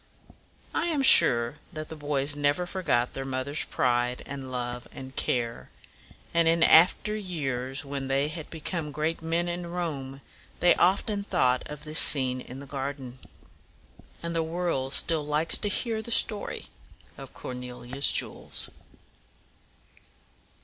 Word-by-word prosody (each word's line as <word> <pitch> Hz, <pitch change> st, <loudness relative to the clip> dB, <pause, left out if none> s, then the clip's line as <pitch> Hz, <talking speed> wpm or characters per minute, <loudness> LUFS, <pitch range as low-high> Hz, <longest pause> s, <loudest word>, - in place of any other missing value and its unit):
I -, -, 0 dB
am 300 Hz, -5 st, 0 dB
sure 120 Hz, -, +7 dB
that 155 Hz, -3 st, -7 dB
the 160 Hz, -, -7 dB
boys 145 Hz, -1 st, +1 dB
never 145 Hz, +4 st, 0 dB
forgot 150 Hz, -10 st, -1 dB
their 135 Hz, -, -3 dB
mother's 135 Hz, +2 st, -2 dB
pride 125 Hz, 0 st, 0 dB
and 135 Hz, -2 st, -7 dB
love 125 Hz, 0 st, -4 dB
and 130 Hz, 0 st, -10 dB
care; 120 Hz, -2 st, -2 dB, 0.6 s
and 170 Hz, -1 st, +3 dB
in 165 Hz, 0 st, +3 dB
after 185 Hz, +5 st, +5 dB
years, 140 Hz, -9 st, -3 dB
when 140 Hz, -1 st, -5 dB
they 135 Hz, +2 st, +1 dB
had 155 Hz, 0 st, -8 dB
become 160 Hz, -1 st, -5 dB
great 155 Hz, +4 st, -2 dB
men 165 Hz, +2 st, -1 dB
in 175 Hz, 0 st, -4 dB
Rome, 145 Hz, -6 st, -5 dB, 0.4 s
they 175 Hz, 0 st, +5 dB
often 200 Hz, +3 st, +1 dB
thought 130 Hz, -11 st, +1 dB
of 150 Hz, 0 st, -9 dB
this 155 Hz, +1 st, +1 dB
scene 130 Hz, -3 st, +3 dB
in 125 Hz, +2 st, -9 dB
the 140 Hz, -, -9 dB
garden. 135 Hz, -2 st, -6 dB, 1.0 s
And 170 Hz, 0 st, -4 dB
the 165 Hz, -, +1 dB
world 160 Hz, -5 st, -2 dB
still 160 Hz, -3 st, +2 dB
likes 150 Hz, +2 st, +2 dB
to 205 Hz, -, 0 dB
hear 225 Hz, +1 st, -1 dB
the 220 Hz, -, -8 dB
story 215 Hz, -2 st, +2 dB, 0.5 s
of -, -, -12 dB
Cornelia's 125 Hz, +2 st, -2 dB
jewels. -, -, +1 dB
145 Hz, 140 wpm, -27 LUFS, 130-170 Hz, 1.0 s, sure